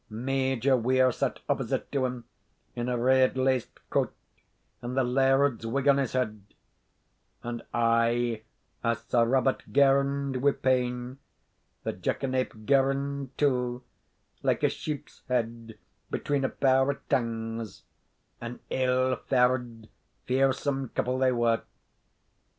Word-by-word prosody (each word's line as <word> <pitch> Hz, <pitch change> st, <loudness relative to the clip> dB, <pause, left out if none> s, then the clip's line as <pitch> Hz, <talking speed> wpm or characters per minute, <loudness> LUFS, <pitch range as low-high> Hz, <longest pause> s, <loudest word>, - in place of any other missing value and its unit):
Major 130 Hz, +2 st, +1 dB
Weir 130 Hz, +1 st, +3 dB
sat -, -, -2 dB
opposite -, -, -1 dB
to 135 Hz, -2 st, +1 dB
him, 125 Hz, -1 st, -6 dB, 0.5 s
in 120 Hz, 0 st, -2 dB
a 125 Hz, -, 0 dB
red 130 Hz, +2 st, +3 dB
laced 130 Hz, -2 st, -1 dB
coat, -, -, +1 dB, 0.7 s
and 125 Hz, +2 st, -5 dB
the 130 Hz, -, +4 dB
laird's 135 Hz, 0 st, +2 dB
wig 135 Hz, +4 st, -1 dB
on 140 Hz, -1 st, +6 dB
his 135 Hz, -2 st, -1 dB
head; 110 Hz, -5 st, -1 dB, 1.0 s
and 120 Hz, 0 st, -4 dB
aye 115 Hz, 0 st, +2 dB, 0.4 s
as 115 Hz, 0 st, 0 dB
Sir 120 Hz, -1 st, +3 dB
Robert 130 Hz, +2 st, +1 dB
girned 140 Hz, -1 st, +3 dB
wi' 140 Hz, +2 st, +3 dB
pain, 125 Hz, 0 st, -1 dB, 0.6 s
the -, -, -2 dB
jackanape 130 Hz, -5 st, -2 dB
girned 140 Hz, 0 st, +1 dB
too, 125 Hz, -3 st, 0 dB, 0.6 s
like -, -, 0 dB
a -, -, +5 dB
sheep's 150 Hz, -2 st, -6 dB
head 115 Hz, -2 st, -2 dB, 0.3 s
between 140 Hz, -1 st, -1 dB
a 135 Hz, -, +1 dB
pair 135 Hz, 0 st, +3 dB
of 140 Hz, -, -4 dB
tangs 115 Hz, -3 st, -2 dB, 0.6 s
an 120 Hz, +1 st, -6 dB
ill 130 Hz, 0 st, +2 dB
faur'd, 125 Hz, -3 st, +1 dB, 0.4 s
fearsome 135 Hz, 0 st, +1 dB
couple 130 Hz, +1 st, 0 dB
they 130 Hz, -1 st, +3 dB
were. 120 Hz, -2 st, +2 dB
130 Hz, 120 wpm, -28 LUFS, 120-135 Hz, 1.0 s, on